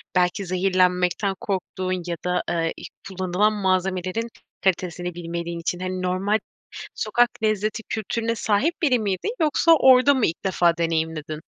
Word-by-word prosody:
belki 180 +2 +1
zehirlenmekten 185 +1 +1
korktuğun 185 -2 -3
ya 170 - -2
da, 180 0 0
eee, 165 -1 0
iii, - - -8 0.2
kullanılan 190 +3 +1
malzemelerin 185 +2 -1 0.3
kalitesini 180 -1 -1
bilmediğin 170 0 -5
için. 175 +1 -3
Hani 185 0 -3
normal 190 +4 0 0.6
sokak 240 +3 +2
lezzeti 215 +1 0
kültürüne 230 +1 -2
sahip 225 +12 0
biri 255 -6 +3
miydin 210 - -2
yoksa 315 +2 +3
orda 265 -1 +6
mı 260 -5 +2
ilk 165 - -3
defa 175 -2 +2
deneyimledin? 160 -2 -2
185 Hz, 135 wpm, -23 LUFS, 175-215 Hz, 0.6 s, orda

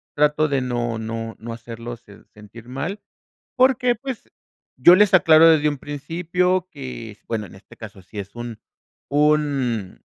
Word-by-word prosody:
trato 150 +1 +3
de 140 -2 0
no 120 -2 -2
no 115 0 -5
no 115 +1 -7
hacerlos 115 0 -8
sen 100 - -17
sentir 105 +3 -14
mal, 170 +11 -4 0.6
porque 255 -1 +3
pues, 255 +1 -8 0.5
yo 175 - +8
les 205 +1 +4
aclaro 165 -2 +7
desde 150 -2 +4
un 145 - -3
principio 175 +6 -1
que 130 -6 -8
es, - - -22
bueno 110 -3 -3
en 90 - -15
este 95 - -17
caso 100 -4 -11
si 105 +3 -11
es 100 +2 -7
un 120 -2 -7 0.5
un 140 -8 0
135 Hz, 160 wpm, -22 LUFS, 115-165 Hz, 0.6 s, yo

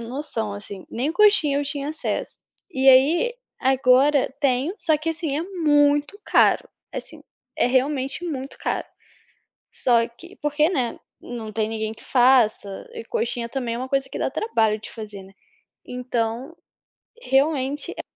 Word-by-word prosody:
noção 230 -3 -4
assim, 200 -2 -9
nem 270 +7 -1
coxinha 400 -9 +4
eu 290 - -1
tinha 285 0 -4
acesso. 315 - -4 0.3
E 265 -5 +2
aí, 315 - +5 0.3
agora 265 +2 +4
tenho, 275 +5 +1
só 315 -3 +2
que 320 +2 -2
assim, 315 -3 -3
é 315 - -1
muito 295 -2 +2
caro, - - +4 0.3
assim, - - -8 0.3
é - - +3
realmente 270 +4 0
muito 275 -5 -5
caro. - - -2 0.9
Só 235 -2 +2
que, 340 +11 -15
porque, 295 +1 +1
né, 260 -10 -1 0.2
não 230 -3 -7
tem 220 0 -1
ninguém 220 0 -3
que - - -17
faça, 245 - +3
e 460 -1 -6
coxinha 350 - -2
também 240 -3 -3
é - - -4
uma 255 +1 -4
coisa 270 0 0
que - - -5
dá - - 0
trabalho 220 - +1
de - - -9
fazer, 210 -3 -8
né? 190 +1 -15 0.5
Então, 250 +3 -3 0.7
realmente 280 - 0
é - - -5
270 Hz, 150 wpm, -23 LUFS, 235-300 Hz, 0.9 s, aí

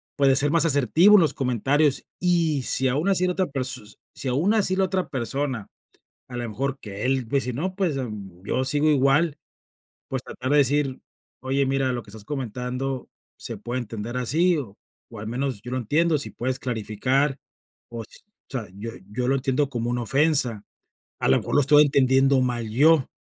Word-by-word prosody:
pues 140 -2 +4
de 130 - +3
ser 145 +2 +4
más 165 +1 +4
asertivo 160 - +5
en 185 - +5
los 155 - +1
comentarios 135 +3 +1 0.2
y 165 -6 +1
si 130 +1 +2
aún 150 +9 0
así 185 -1 +2
la 180 - 0
otra 185 +1 0
pers 130 -7 -5 0.2
si - - -5
aún 155 - +1
así 195 -3 +2
la 190 0 +2
otra 185 0 -2
persona 130 -2 -3 0.6
a 125 - -8
la 120 -1 -3
mejor 135 +5 -3
que 100 -1 -6
él 130 -3 0
dice: 135 -1 0
"No 185 +9 -4
pues, 180 -8 0
em, 100 -8 -7
yo 130 +6 -1
sigo 145 +3 +3
igual", 145 +2 +2 0.7
pues 130 -2 -3
tratar 130 +1 -6
de 145 - +4
decir: 140 -1 +1 0.4
"Oye, 135 +2 0
mira, 135 -1 0
lo 120 -1 -4
que 100 - -16
estás 105 -1 -10
comentando 130 -1 -4 0.3
se 115 - -5
puede 120 +5 -4
entender 115 +1 -5
así 160 +9 +2
o 110 -8 -7 0.4
o 110 - -9
al 105 - -7
menos 125 -1 -3
yo 125 - -8
lo 130 - -1
entiendo, 155 +7 +1
si 140 - -2
puedes 130 +1 -3
clarificar, 130 +4 -1 0.5
o 115 -1 -7 0.4
sea, 120 -7 -5
yo 110 +4 -6 0.2
yo 125 +3 -2
lo 135 - +3
entiendo 135 +1 0
como 120 -2 -3
una 120 0 -1
ofensa, 135 -5 +2 0.6
a - - 0
la - - +5
mejor - - -3
lo 145 - +5
estoy 145 +2 +6
entendiendo 135 -1 +3
mal 120 -3 -1
yo, 145 +5 +4
135 Hz, 190 wpm, -24 LUFS, 120-145 Hz, 0.7 s, estoy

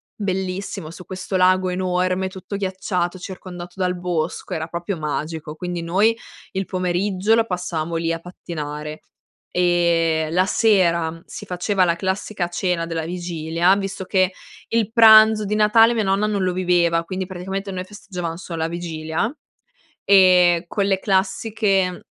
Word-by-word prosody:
bellissimo 190 -3 -3
su 180 +1 -11
questo 185 0 -4
lago 185 0 +3
enorme, 185 +1 0
tutto 190 +2 -8
ghiacciato, 185 -2 -2
circondato 180 -1 -9
dal 180 -1 0
bosco, 175 -3 -3
era 160 0 -3
proprio 175 +2 -4
magico! 155 0 -4
Quindi 175 0 -4
noi 195 +7 +2 0.4
il 190 0 -2
pomeriggio 185 +3 0
lo 225 0 +2
passavamo 175 -4 -3
lì 165 0 0
a 165 - -4
pattinare 150 -3 -7 0.5
e, 170 -3 +2
la 185 +2 +3
sera 170 -6 +2
si - - -9
faceva 185 +1 +1
la 170 -1 +1
classica 190 +1 -2
cena 175 -1 -1
della 165 -1 -3
vigilia, 175 0 0
visto 195 -1 -4
che 185 -1 +2 0.4
il 225 -2 0
pranzo 220 -1 +7
di 210 +1 -1
Natale 225 +2 +5
mia 225 - 0
nonna 195 +1 +1
non 205 -3 -1
lo 185 - +1
viveva, 175 -2 +2
quindi 185 +1 -4
praticamente 190 +2 -5
noi 185 -1 -4
festeggiavamo 180 -4 -6
solo 165 -3 -6
a 160 - +1
vigilia 165 - -3 0.7
e 180 -3 +5
quelle 195 -1 0
classiche, 195 -1 0
180 Hz, 145 wpm, -21 LUFS, 170-195 Hz, 0.7 s, pranzo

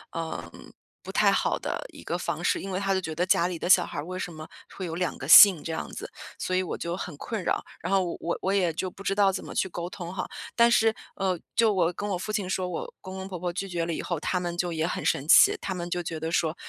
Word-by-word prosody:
嗯， 120 - -6 0.3
不 - - -8
太 - - +4
好 - - +1
的 - - -4
一 - - -13
个 - - -3
方 - - -3
式， - - +1
因 195 - -6
为 185 0 -2
他 195 -1 0
就 190 - 0
觉 160 -2 -5
得 175 - +1
家 180 -2 +3
里 175 -2 -4
的 175 - -4
小 180 -1 +7
孩 - - -7
儿 145 - -3
为 185 +1 -5
什 175 - -4
么 155 0 -9 0.3
会 190 - -4
有 165 - -5
两 175 -1 -2
个 135 - -7
姓 180 -2 +10
这 165 - -4
样 - - -5
子。 - - -7 0.3
所 185 - -2
以 185 - +3
我 185 - -4
就 170 +1 -3
很 180 -6 -6
困 215 +1 -4
扰， - - 0 0.2
然 180 - -4
后 195 -1 +3 0.2
我 170 - -2
我 190 +1 0
也 180 -4 +2
就 185 +2 -3
不 195 - -14
知 195 0 -1
道 200 -2 +4
怎 185 - -5
么 - - -9
去 - - +1
沟 175 0 -5
通 180 -1 -7
哈。 185 - -3 0.3
但 235 0 +6
是， 225 -1 +4 0.2
呃， 185 -3 -1 0.2
就 225 -3 +4
我 175 -2 +2
跟 205 +4 -5
我 195 - -1
父 200 +4 -4
亲 205 -4 -1
说 185 -1 -1
“我 170 - -5
公 190 0 -8
公 190 0 -6
婆 175 0 -2
拒 195 +2 -4
绝 175 -2 -2
了” 170 - -4
以 - - -3
后， 175 -4 -2
他 180 - -1
们 175 -1 -3
就 175 0 -1
也 160 0 -1
很 175 - -3
生 140 +3 0
气， - - +7
他 190 - -3
们 175 -1 -5
就 175 0 -2
觉 160 -1 -4
得 160 +1 -3
说 165 -1 +1
180 Hz, 310 characters per minute, -27 LUFS, 170-190 Hz, 0.3 s, 姓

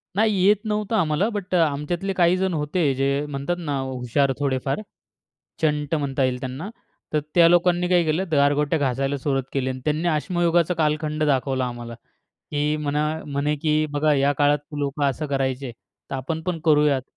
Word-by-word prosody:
नाही. 215 0 +3
येत 210 +1 +6
नव्हतं 210 +1 -1
आम्हाला. 165 +1 +2
बट 195 -4 -3
आमच्यातले 170 +4 0
काही 180 0 +3
जण 190 -1 0
होते 150 -1 0
जे 140 +2 0
म्हणतात 145 +4 -3
ना 145 -5 -2
हुशार 130 +1 0
थोडेफार. 135 +5 -1 0.8
चंट 150 0 +1
म्हणता 140 -3 0
येईल 125 -1 -1
त्यांना, 130 +9 -5 0.4
तर 150 - +2
त्या 170 -1 +7
लोकांनी 175 0 +3
काय 175 -1 +4
केलं 160 +5 0
गारगोट्या 145 +2 +2
घासायला 135 +1 0
सुरुवात 135 -1 0
केली 130 -1 -1
आणि 130 0 -5
त्यांनी 155 +3 0
अश्मयुगाचा 170 +1 +1
कालखंड 155 0 0
दाखवला 135 -2 +1
आम्हाला 120 -1 -6 0.6
की 150 +1 0
म्हणा 150 0 -1 0.2
म्हणे 145 +1 -1
की 155 +1 +1
बघा 150 +1 +2
या 140 +1 +3
काळात 145 0 +4 0.2
लोकं 145 0 -1
असं 150 +3 -4
करायचे, 135 -2 -2 0.4
तर - - -3
आपण 160 +5 -4
पण 175 -2 -1
करूयात. 150 -4 +3
150 Hz, 165 wpm, -23 LUFS, 140-170 Hz, 0.8 s, त्या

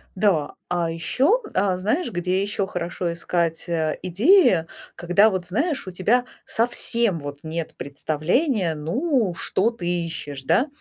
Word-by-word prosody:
Да. 185 -7 +1 0.2
А 175 -2 0
еще, 265 - +1
а, 190 -1 +2
знаешь, 220 - -1
где 180 +1 0
еще 200 -1 -1
хорошо 175 -1 -3
искать, 170 0 -1
э, 160 -2 -1
идеи, 190 - +4 0.3
когда 180 +5 +4
вот 185 -3 -3
знаешь, 285 - -1
у - - -4
тебя 220 +8 +2 0.2
совсем 230 -4 +1
вот 145 -1 -7
нет 160 0 -4
представления, 160 - 0
ну, 220 - 0
что 195 +5 +1
ты 205 -7 -6 0.2
ищешь, 145 -4 -6
да, 245 - +2
180 Hz, 140 wpm, -23 LUFS, 165-225 Hz, 0.3 s, идеи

